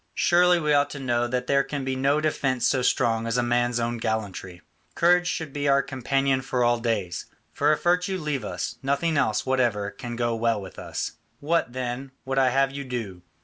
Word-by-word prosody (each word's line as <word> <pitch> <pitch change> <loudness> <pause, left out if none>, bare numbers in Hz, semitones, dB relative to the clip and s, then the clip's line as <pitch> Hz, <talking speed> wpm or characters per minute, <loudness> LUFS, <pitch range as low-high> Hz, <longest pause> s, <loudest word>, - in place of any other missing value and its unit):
Surely 175 0 +4
we 150 -2 +1
ought 145 0 +3
to 145 - -7
know 120 -2 0
that 125 +1 -2
there 140 +1 +3
can 140 -2 -4
be 130 0 -1
no 140 +3 +2
defence 135 -5 0
so 130 - +2
strong 115 -2 +1
as 115 +1 0
a 125 - +2
man's 120 0 +1
own 120 0 -2
gallantry. 100 -5 -4 0.3
Courage 175 +1 +4
should 160 -5 -3
be 145 0 -1
our 140 0 +4
companion 135 0 0
all 125 -1 +2
our - - -10
days. 105 -7 -2 0.3
For 145 +1 +2
if 155 - 0
virtue 180 +2 +2
leave 150 -7 -3
us, - - -4
nothing 140 +4 0
else 130 -7 +1
whatever 120 -6 +1
can 120 +3 -7
go 120 0 0
well 115 -1 +1
with 95 -2 -10
us. - - -5 0.2
What, 155 -4 0
then, 130 +1 -4
would 135 +1 0
I 130 -1 +4
have 135 +2 +2
you 140 0 -5
do? 115 -8 -5
130 Hz, 205 wpm, -25 LUFS, 120-145 Hz, 0.3 s, Surely